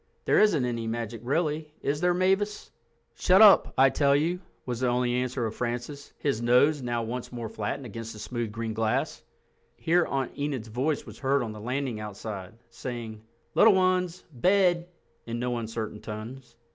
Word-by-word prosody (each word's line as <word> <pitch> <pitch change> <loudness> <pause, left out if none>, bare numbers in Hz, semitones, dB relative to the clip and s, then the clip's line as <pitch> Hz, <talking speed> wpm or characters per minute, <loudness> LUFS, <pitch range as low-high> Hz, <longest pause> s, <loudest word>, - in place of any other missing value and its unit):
There - - +4
isn't 165 -12 +4
any 115 -2 -2
magic 115 0 -4
really, 150 +2 -1
is 145 +2 -1
there, 180 0 +3
Mavis?" 195 +3 0 0.4
"Shut 185 +10 +4
up, 215 -2 +8
I 135 0 +6
tell 140 -1 +3
you," 165 +5 +1 0.3
was 120 -2 -3
the 130 - +1
only 120 0 +1
answer 125 0 -1
of 110 - -3
Francis, 120 +5 -4
his 135 -6 -1
nose 130 +5 +4
now 120 -2 -1
once 120 +2 -5
more 120 -2 -5
flattened 110 +5 -4
against 115 0 -7
the - - -11
smooth 115 +1 -4
green 115 0 -4
glass. 110 0 -1 0.5
Here 170 +1 +2
Aunt 135 -2 -1
Enid's 140 -6 -3
voice 135 +7 -1
was - - -11
heard 135 -1 +1
on 115 - -4
the 105 -1 -9
landing 125 0 -2
outside, 105 -1 -7 0.2
saying, 115 -3 -6 0.3
"Little 220 -2 +6
ones—bed," 180 -1 +2 0.4
in 115 0 -3
no 120 0 -1
uncertain 110 -1 -5
tones. 115 +3 -8
125 Hz, 170 wpm, -27 LUFS, 115-150 Hz, 0.5 s, up